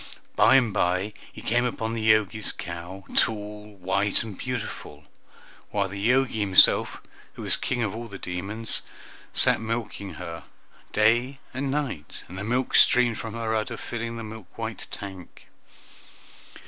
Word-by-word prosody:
By 135 - +6
and 120 -6 +4
by 90 +4 +1 0.2
he - - -11
came 120 +2 +2
upon 115 -2 -2
the 110 -1 0
Jogi's 110 0 +1
cow, 90 +2 -7
tall, 105 -1 0
white, 95 +3 +1
and 110 -3 -7
beautiful, 105 - -5 0.7
while 100 -1 0
the 100 +1 -6
Jogi 130 -3 +2
himself, 95 -3 +5 0.3
who - - -8
was - - +2
king 125 -2 -1
of 105 - -1
all 115 +1 -6
the 100 -3 -8
demons, 100 +6 +1 0.5
sat - - +5
milking 110 -3 -4
her - - -7 0.5
day 120 +5 +3 0.2
and 135 +2 -2
night, 135 - -3
and 95 - -8
the - - -4
milk 125 +4 -1
streamed 120 -2 +5
from 115 -1 -6
her 115 -1 -2
udder, 110 -1 -1
filling 115 0 -5
the 115 - -5
milk 110 -2 -9
white - - -5
tank. 95 -3 -9
110 Hz, 150 wpm, -26 LUFS, 100-115 Hz, 0.7 s, By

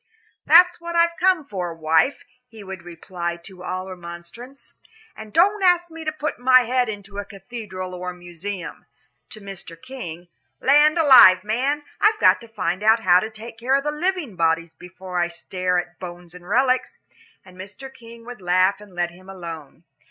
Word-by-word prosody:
"That's 350 +2 +6
what 340 0 -6
I've 335 0 +3
come 365 -5 +2
for, 180 -8 -5
wife," 160 - +1 0.2
he 225 -4 -13
would 190 -2 -8
reply 170 0 -6
to 185 0 -12
all 185 +1 -4
remonstrance, 180 +9 -11 0.4
"and 215 -1 -10
don't 400 - +3
ask 350 -2 +3
me 325 0 -9
to 310 - -1
put 305 -3 -4
my 255 0 +6
head 250 0 0
into 205 -1 -7
a - - -3
cathedral 195 -2 -8
or 180 0 -5
a - - -6
museum." 175 +2 -8 0.4
To 215 - -12
Mr. 195 -4 -10
King, 175 -9 -9 0.3
"Land 295 +4 +4
alive, 255 - +8
man, 265 +8 -1 0.2
I've 425 +1 +3
got - - +4
to 230 - -12
find 195 -4 -3
out 220 +2 +4
how 180 -3 +5
to 220 - -4
take 225 +1 -11
care 255 +3 +1
of 275 +1 0
living 300 - -2
bodies 165 -1 0
before 180 +1 -7
I 175 - +2
stare 180 +1 -2
at 175 0 -4
bones 175 -1 -9
and 180 0 -13
relics," 255 +3 +1 0.5
and 185 -1 -16
Mr. 205 +9 -10
King 230 -1 -14
would 245 -4 -10
laugh 185 +3 +2
and 200 -3 -15
let 175 -1 -1
him 185 +2 -16
alone. 165 -5 -9
200 Hz, 180 wpm, -22 LUFS, 180-265 Hz, 0.5 s, alive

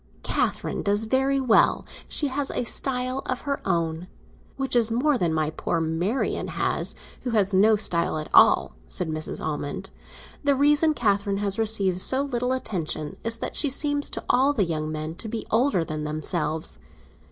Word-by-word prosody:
"Catherine - - -1
does 205 +2 +1
very 270 +4 +1
well; 255 -4 +3 0.2
she 300 - 0
has 275 +1 -2
a - - -1
style 255 +2 -1
of 255 - -2
her 280 -1 -3
own—which 170 +9 -3
is 235 -2 +4
more 265 +6 +2
than 175 -8 0
my 155 -1 0
poor 165 +1 -2
Marian 165 +10 -1
has, - - -1 0.3
who 250 - -4
has 200 -1 +2
no 210 +3 +5
style 170 -6 +2
at 155 - -4
all," - - +5
said 175 - -1
Mrs. 155 0 -5
Almond. 145 -2 -4 0.5
"The 285 -1 +3
reason 295 +3 +3
Catherine 200 -4 +1
has 200 +1 -1
received 200 -5 +2
so 265 +6 +3
little 250 -2 -2
attention 165 - -3
is 230 0 0
that - - -4
she 290 - +3
seems 290 +1 -1
to - - -4
all 270 +3 +3
the 205 -9 +1
young 155 -2 -3
men 155 +1 -4
to 225 - -6
be 225 0 -4
older 225 -7 +2
than 155 -1 -4
themselves. 155 +1 -2
215 Hz, 170 wpm, -25 LUFS, 165-260 Hz, 0.5 s, no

